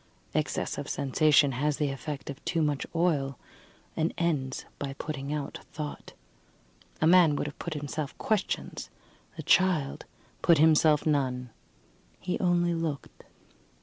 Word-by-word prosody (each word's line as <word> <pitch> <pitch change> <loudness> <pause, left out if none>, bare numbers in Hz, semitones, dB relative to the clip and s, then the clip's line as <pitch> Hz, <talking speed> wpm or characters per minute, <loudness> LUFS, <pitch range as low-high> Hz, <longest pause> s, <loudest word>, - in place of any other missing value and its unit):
Excess - - -1
of - - -5
sensation 145 +1 +3
has 145 +3 0
the 145 -2 0
effect 140 +1 -5
of 140 - -12
too 165 -2 0
much 145 -2 -1
oil, 145 -6 +1 0.6
and 160 +1 0
ends 145 -6 -1
by 140 -1 -3
putting 140 -1 -5
out 150 -2 -4
thought. 150 -1 -6 0.9
A - - +4
man 170 -3 +6
would - - -2
have 145 - -7
put 170 -2 -4
himself 145 0 -4
questions; 215 -3 -2 0.5
the - - -5
child 175 -7 +2 0.4
put 170 -2 +5
himself 155 0 +5
none 130 -5 0 0.7
he 180 - -2
only 175 -1 +2
looked. 160 -4 -4
150 Hz, 135 wpm, -28 LUFS, 140-165 Hz, 0.9 s, man